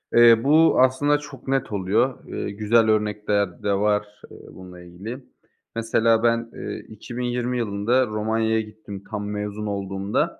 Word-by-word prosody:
Eee, 115 -1 +7
bu 155 +3 +5
aslında 130 +3 +3
çok 145 -3 -12
net 135 -3 0
oluyor. 105 +6 0
Iıı, - - -4
güzel 110 +2 +2
örnekler 105 -3 0
de 100 - +1
var, 105 +1 0
ııı, - - -14
bununla 90 -1 -11
ilgili. 100 +9 -8 0.5
Mesela 115 0 +2
ben, 115 0 +4 0.2
ııı, - - -6
2020 120 +3 -4
yılında 115 +3 +1
Romanya'ya 110 +1 0
gittim 105 -2 -10
tam 105 -1 -3
mezun 105 0 -4
olduğumda. 100 0 -2
110 Hz, 140 wpm, -23 LUFS, 105-120 Hz, 0.5 s, Eee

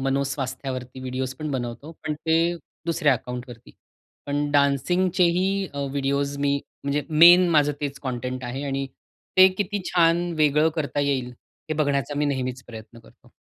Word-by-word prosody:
मनोस्वास्थ्यावरती 135 -1 -3
videos 130 0 -4
पण 155 +2 -5
बनवतो, 125 +3 -5
पण 155 -1 -1
ते 160 +2 0 0.5
दुसऱ्या 155 -4 +2
अकाउंटवरती. 125 -1 -6 0.6
पण 145 +1 -1
डान्सिंगचेही 170 +6 +2 0.3
अ, - - -5
व्हिडिओज 140 0 -1
मी, 140 0 +1 0.3
म्हणजे 140 +1 0
मेन 175 +3 +7
माझं 150 -2 +3
तेच 140 -1 -4
कंटेंट 130 -1 -4
आहे 130 +3 -4
आणि 135 0 -2 0.5
ते 185 0 +9
किती 205 0 -1
छान 170 0 +3
वेगळं 150 +1 +3
करता 145 -3 -2
येईल, 135 -3 0 0.4
हे 155 - -1
बघण्याचा 145 -2 0
मी 150 - +1
नेहमीच 130 -2 -2
प्रयत्न 115 0 -11
करतो. 115 - -21
140 Hz, 145 wpm, -24 LUFS, 130-155 Hz, 0.6 s, ते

